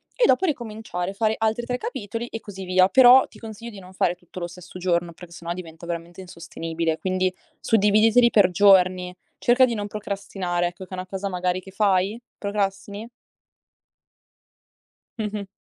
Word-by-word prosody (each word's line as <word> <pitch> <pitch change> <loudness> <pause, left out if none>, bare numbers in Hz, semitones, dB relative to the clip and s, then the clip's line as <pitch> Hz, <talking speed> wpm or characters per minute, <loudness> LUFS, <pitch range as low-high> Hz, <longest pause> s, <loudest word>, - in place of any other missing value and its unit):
e - - +3
dopo 315 +9 +3
ricominciare, 215 - -3
fare 220 +1 +1
altri 225 +2 0
3 250 0 -2
capitoli 235 -1 -5
e 225 - -6
così 195 -3 -9
via. 185 0 +4
Però 260 0 +7
ti - - -17
consiglio 225 +1 -8
di 200 - -10
non 185 0 -13
fare 180 -1 +1
tutto 180 +1 -11
lo 175 - -3
stesso 180 +1 -11
giorno 175 -1 0
perché 175 0 -13
sennò 170 0 -6
diventa 170 -2 -10
veramente 170 +1 -6
insostenibile. 165 -2 -4
Quindi 185 0 0 0.3
suddividiteli 220 +3 +4
per 200 -4 +5
giorni, 185 -1 +4 0.3
cerca 250 +2 +5
di 240 - -2
non 205 -2 -3
procrastinare, 195 -4 -3
ecco 175 +2 -8
che - - -29
è - - -7
una 185 0 -4
cosa 195 +1 -4
magari 180 0 -1
che 190 - -13
fai. 195 +1 +1 0.2
Procrastini? 200 +2 -3 2.1
Mh-mh. 210 -2 -3
195 Hz, 165 wpm, -24 LUFS, 180-220 Hz, 2.1 s, Però